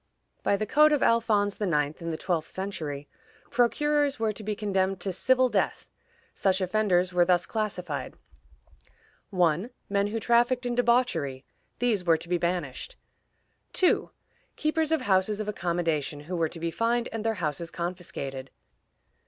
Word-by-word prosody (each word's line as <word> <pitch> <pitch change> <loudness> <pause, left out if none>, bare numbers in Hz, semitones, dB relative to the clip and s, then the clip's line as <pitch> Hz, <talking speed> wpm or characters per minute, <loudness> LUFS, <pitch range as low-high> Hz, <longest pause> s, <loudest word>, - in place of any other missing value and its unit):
By 200 - +2
the 215 - -1
code 305 +7 +5
of 295 - +2
Alphonse 215 -3 +2
IX., 150 -5 0
in 165 - -4
the 160 - -2
twelfth 165 -2 -2
century, 155 -7 -5 0.4
procurers 290 +4 +2
were 220 -1 +1
to 215 - -8
be 210 0 -2
condemned 195 -2 0
to 190 0 -2
"civil 255 +7 +3
death." - - -1 0.5
Such 190 -1 +1
offenders 185 -2 +1
were 175 0 +5
thus 175 0 +2
classified: 215 -5 -3 1.1
1. 180 +2 +1 0.2
Men 200 0 +1
who 225 +2 -2
trafficked 240 +3 +2
in 245 - 0
debauchery; 235 - +1 0.3
these 225 -6 +1
were 165 -2 +4
to 170 - -9
be 175 0 0
banished. 170 -7 -2 0.8
2. 370 - +2 0.5
Keepers 310 0 0
of 320 - +2
houses 200 +1 +2
of 215 - -3
accommodation, 170 -7 -1
who 175 +5 -5
were 165 -2 +1
to 165 - -9
be 165 0 -2
fined, 235 +5 0
and 225 -1 -4
their 225 0 0
houses 165 -2 -3
confiscated. 170 -7 -5
195 Hz, 155 wpm, -27 LUFS, 170-230 Hz, 1.1 s, code